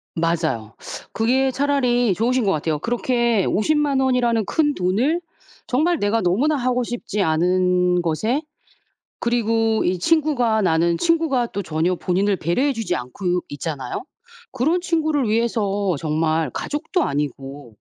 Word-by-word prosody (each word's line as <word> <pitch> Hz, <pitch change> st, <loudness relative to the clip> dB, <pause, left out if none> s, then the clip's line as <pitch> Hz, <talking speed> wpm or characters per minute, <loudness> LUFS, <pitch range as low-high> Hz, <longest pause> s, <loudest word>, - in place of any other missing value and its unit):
맞아요. 160 Hz, -10 st, -1 dB, 0.4 s
그게 260 Hz, +4 st, +2 dB
차라리 250 Hz, -6 st, +1 dB
좋으신 245 Hz, +4 st, +1 dB
것 195 Hz, -, +2 dB
같아요. 155 Hz, -1 st, -1 dB
그렇게 235 Hz, -1 st, +1 dB
500,000 290 Hz, +3 st, +1 dB
원이라는 240 Hz, -4 st, +1 dB
큰돈을 290 Hz, -, +1 dB, 0.5 s
정말 315 Hz, +7 st, +1 dB
내가 210 Hz, +2 st, +1 dB
너무나 245 Hz, -, +2 dB
하고 250 Hz, -1 st, 0 dB
싶지 230 Hz, -3 st, -3 dB
않은 180 Hz, +1 st, +2 dB
것에 215 Hz, -, 0 dB, 0.8 s
그리고 225 Hz, -2 st, +1 dB
이 180 Hz, 0 st, 0 dB
친구가 250 Hz, -, +2 dB
나는 170 Hz, -1 st, +2 dB
친구가 320 Hz, -8 st, +1 dB
또 200 Hz, -2 st, -5 dB
전혀 165 Hz, +3 st, 0 dB
본인을 195 Hz, +3 st, 0 dB
배려해 250 Hz, -, 0 dB
주지 205 Hz, -6 st, -2 dB
않고 175 Hz, +8 st, -2 dB
있잖아요. 145 Hz, -, -5 dB, 0.5 s
그런 310 Hz, +8 st, +1 dB
친구를 315 Hz, -7 st, 0 dB
위해서 205 Hz, -5 st, 0 dB
정말 155 Hz, 0 st, 0 dB
가족도 305 Hz, +4 st, -2 dB
아니고 140 Hz, -4 st, -4 dB
220 Hz, 285 characters per minute, -21 LUFS, 175-260 Hz, 0.8 s, 그게